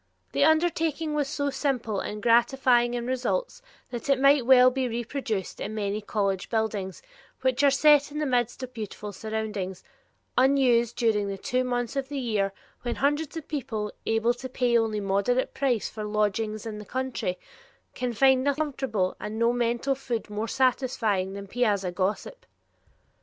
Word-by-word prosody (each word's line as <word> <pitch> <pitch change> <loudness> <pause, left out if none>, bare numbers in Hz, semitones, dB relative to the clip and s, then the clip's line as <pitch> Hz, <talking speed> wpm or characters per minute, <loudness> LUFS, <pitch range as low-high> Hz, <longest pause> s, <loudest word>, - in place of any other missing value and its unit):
The - - +2
undertaking 320 -1 +2
was 295 -2 0
so 285 0 -2
simple 245 -8 -1
and 210 +1 -5
gratifying 240 0 +3
in 240 -1 -3
results 265 - -2 0.3
that 240 +3 -5
it 275 -1 +4
might 275 -2 +4
well 255 -1 +7
be 260 0 -1
reproduced 235 -3 -3
in 215 +2 -4
many 205 0 -2
college 200 -3 -1
buildings 215 -4 -2 0.4
which 260 +1 +1
are 285 - +7
set 290 +1 +5
in 300 - -6
the 300 - 0
midst 245 -1 0
of 255 0 -7
beautiful 210 -2 -6
surroundings, 210 -3 -4 0.5
unused 250 -3 +3
during 220 -4 +1
the 195 0 -4
two 250 +6 0
months 245 0 -2
of 270 -1 -2
the 290 - -4
year 215 -6 0 0.3
when 240 -1 -3
hundreds 290 +3 0
of 320 - -7
people, 220 -8 -3 0.2
able 225 +2 +2
to 260 +1 -8
pay 245 -1 +1
only 225 -2 +2
a - - -2
moderate 200 +6 +1
price 255 -6 0
for 215 - -7
lodgings 210 +1 -1
in 215 -2 -5
the 210 - -9
country, 255 -8 -3 0.6
can 250 -1 -2
find 260 +3 +4
nothing 285 +1 0
comfortable 240 -10 -2
and 215 +1 -5
no 230 +1 +3
mental 240 +3 0
food 240 -5 -4
more 210 +2 -2
satisfying 235 -7 +1
than 200 0 -7
piazza 200 -4 0
gossip. 200 - -3
240 Hz, 170 wpm, -27 LUFS, 215-270 Hz, 0.6 s, well